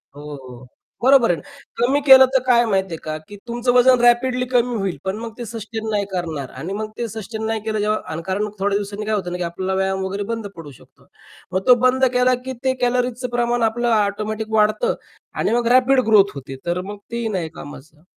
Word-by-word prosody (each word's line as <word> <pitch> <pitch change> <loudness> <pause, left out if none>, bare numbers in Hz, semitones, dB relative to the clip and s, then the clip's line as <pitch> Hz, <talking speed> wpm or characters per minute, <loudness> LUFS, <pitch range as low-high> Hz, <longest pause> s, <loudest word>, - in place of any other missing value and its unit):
हो, 145 - -10
हो. 125 -2 -12 0.4
बरोबर 260 -6 +5
आहे. 170 - -2 0.4
कमी 260 +5 +2
केलं 265 -1 +9
तर - - +6
काय 240 -1 +4
माहिती 190 -4 0
आहे - - -4
का? 155 0 -4
की 205 - -10
तुमचं 240 +1 0
वजन 250 0 +5
रॅपिडली 250 +1 +3
कमी 245 0 +2
होईल, 195 -5 -2
पण 190 +1 -1
मग 230 -1 -7
ते 240 - -6
सस्टेन 220 0 -6
नाही 205 -2 0
करणार. 160 -8 -4
आणि 165 +9 -6
मग 215 +1 -4
ते 235 - -2
सस्टेन 220 +1 -6
नाही 220 0 -1
केलं 215 -1 -1
जेव्हा 210 +1 +1 0.2
अकारण 190 +5 -2
थोड्या 200 +1 +1
दिवसांनी 205 +1 -5
काय 215 0 0
होतं 180 -3 -3
ना, 180 - -3
की 180 - -3
आपल्याला 185 +3 -3
व्यायाम 190 0 -1
वगैरे 200 +2 -3
बंद 225 -2 -4
पडू 160 -4 -10
शकतो. 130 - -20 0.5
मग 185 - +1
तो 250 - +8
बंद 260 +1 +4
केला, 250 0 +3
की 260 - -4
ते 260 0 +2
कॅलरीजच 250 0 0
प्रमाण 240 0 0
आपलं 240 +2 0
ऑटोमॅटिक 215 +1 -2
वाढतं 215 - +2 0.4
आणि - - -1
मग 235 0 +1
रॅपिड 260 +1 +5
ग्रोथ 200 -2 +5
होते. 135 0 -8
तर 175 +1 -1
मग 205 +2 -8
तेही 235 -1 -2
नाही 165 -2 -3
कामाचं. 150 +2 -12
215 Hz, 210 wpm, -20 LUFS, 190-240 Hz, 0.5 s, केलं